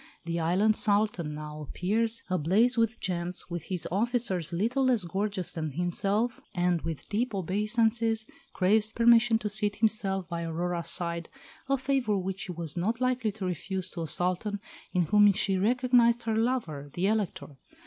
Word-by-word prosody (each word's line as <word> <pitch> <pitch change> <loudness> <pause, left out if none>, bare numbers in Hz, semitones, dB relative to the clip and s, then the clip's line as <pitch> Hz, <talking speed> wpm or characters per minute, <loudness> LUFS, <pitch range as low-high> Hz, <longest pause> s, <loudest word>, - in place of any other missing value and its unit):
The 170 0 -2
island 185 +7 +2
Sultan 205 -8 +1
now 150 0 -7
appears, 220 - -1
ablaze 190 +8 +3
with 230 0 +1
gems, 180 0 -3
with 170 -2 -4
his 180 -3 -2
officers 200 -5 0
little 235 +10 0
less 245 -6 +3
gorgeous 190 +1 -3
than 155 -3 -4
himself, 195 - -1
and 175 -1 +1
with 165 -3 -5
deep 225 +1 -1
obeisances 220 +4 +1 0.3
craves 210 +3 +2
permission 235 0 +5
to 215 - -4
seat 205 0 0
himself 200 -4 0
by 170 0 -4
Aurora's 170 +1 -2
side, 170 -1 -1 0.4
a 275 - +3
favour 265 -5 0
which 190 0 -3
she 195 - -4
was 165 -3 -4
not 215 +7 -1
likely 255 -3 0
to 205 -2 -5
refuse 185 +2 -3
to 170 - -6
a 165 - -3
Sultan 180 +6 -1 0.3
in 180 -2 +2
whom 205 +5 +5
she 195 -1 0
recognised 240 +2 +3
her 225 -1 -1
lover, 220 - -1
the 180 - -1
Elector. 200 -9 -2
200 Hz, 160 wpm, -28 LUFS, 175-225 Hz, 0.4 s, permission